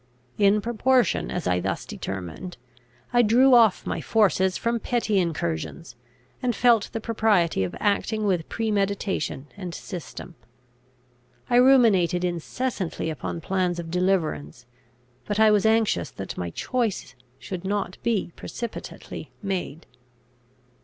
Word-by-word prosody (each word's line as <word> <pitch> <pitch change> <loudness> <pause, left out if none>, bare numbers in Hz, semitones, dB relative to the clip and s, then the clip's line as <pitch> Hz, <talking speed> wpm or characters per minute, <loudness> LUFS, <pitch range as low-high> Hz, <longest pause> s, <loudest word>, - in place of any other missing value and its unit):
In 205 +1 +4
proportion 240 +1 +1
as 180 - -3
I 90 0 +2
thus 95 +2 -3
determined, 95 - -6 0.6
I 240 - +6
drew 245 +4 +5
off 230 -5 +5
my - - -2
forces 190 -4 +2
from 235 0 -1
petty 225 -4 0
incursions, 150 - -3 0.5
and 245 -2 0
felt 235 -4 +4
the 225 - -3
propriety 210 - +1
of 90 - -4
acting 210 +1 0
with 180 -5 0
premeditation 200 -9 -1
and 185 -4 -6
system. 180 0 -8 1.2
I 240 - +5
ruminated 220 -9 +5
incessantly 180 0 -2
upon 160 +2 -5
plans 180 0 0
of 165 -1 -6
deliverance, 180 -8 -1 0.6
but 205 0 -2
I 220 -1 +6
was 210 0 +3
anxious 220 - +2
that - - -7
my 90 -1 -4
choice 220 - -2 0.2
should 185 -2 -6
not 195 -1 -2
be 225 -7 0
precipitately 235 -2 -7
made. 180 -5 -3
195 Hz, 125 wpm, -25 LUFS, 170-225 Hz, 1.2 s, I